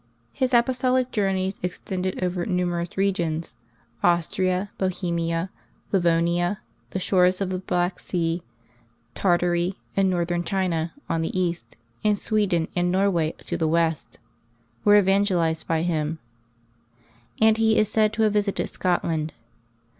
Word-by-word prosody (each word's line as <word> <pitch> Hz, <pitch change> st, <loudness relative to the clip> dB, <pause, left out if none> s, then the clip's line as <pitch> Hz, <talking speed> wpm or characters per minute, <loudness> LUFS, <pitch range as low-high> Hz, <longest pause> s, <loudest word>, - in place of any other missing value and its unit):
His 260 Hz, 0 st, 0 dB
apostolic 255 Hz, +1 st, +2 dB
journeys 195 Hz, -2 st, 0 dB
extended 185 Hz, +1 st, -3 dB
over 180 Hz, -1 st, -1 dB
numerous 175 Hz, -2 st, -1 dB
regions. 170 Hz, -5 st, -1 dB, 0.5 s
Austria, 180 Hz, +3 st, +1 dB
Bohemia, 170 Hz, -2 st, -1 dB, 0.4 s
Livonia, 175 Hz, +1 st, +2 dB, 0.3 s
the -, -, -4 dB
shores 185 Hz, -1 st, +3 dB
of 195 Hz, -2 st, -2 dB
the 185 Hz, -, -2 dB
Black 180 Hz, -1 st, -1 dB
Sea, 170 Hz, -1 st, -1 dB, 0.7 s
Tartary, 175 Hz, 0 st, +1 dB, 0.2 s
and 195 Hz, -1 st, +3 dB
Northern 175 Hz, -1 st, 0 dB
China 170 Hz, -3 st, -1 dB, 0.2 s
on 165 Hz, -, 0 dB
the 165 Hz, +3 st, -2 dB
east, 175 Hz, -1 st, -3 dB, 0.3 s
and 210 Hz, -1 st, +3 dB
Sweden 195 Hz, -7 st, +1 dB
and 175 Hz, 0 st, +1 dB
Norway 185 Hz, -4 st, +1 dB
to -, -, -3 dB
the 160 Hz, -, +1 dB
west, 165 Hz, -1 st, 0 dB, 0.7 s
were 205 Hz, 0 st, +6 dB
evangelized 190 Hz, -5 st, +2 dB
by 165 Hz, -1 st, +1 dB
him, 160 Hz, -2 st, -1 dB, 1.2 s
and 220 Hz, 0 st, +5 dB
he 220 Hz, 0 st, +3 dB
is 215 Hz, -, +4 dB
said 215 Hz, 0 st, +2 dB
to 220 Hz, +1 st, +1 dB
have 215 Hz, -1 st, +3 dB
visited 205 Hz, -1 st, 0 dB
Scotland. 165 Hz, -3 st, -1 dB
180 Hz, 125 wpm, -24 LUFS, 170-195 Hz, 1.2 s, were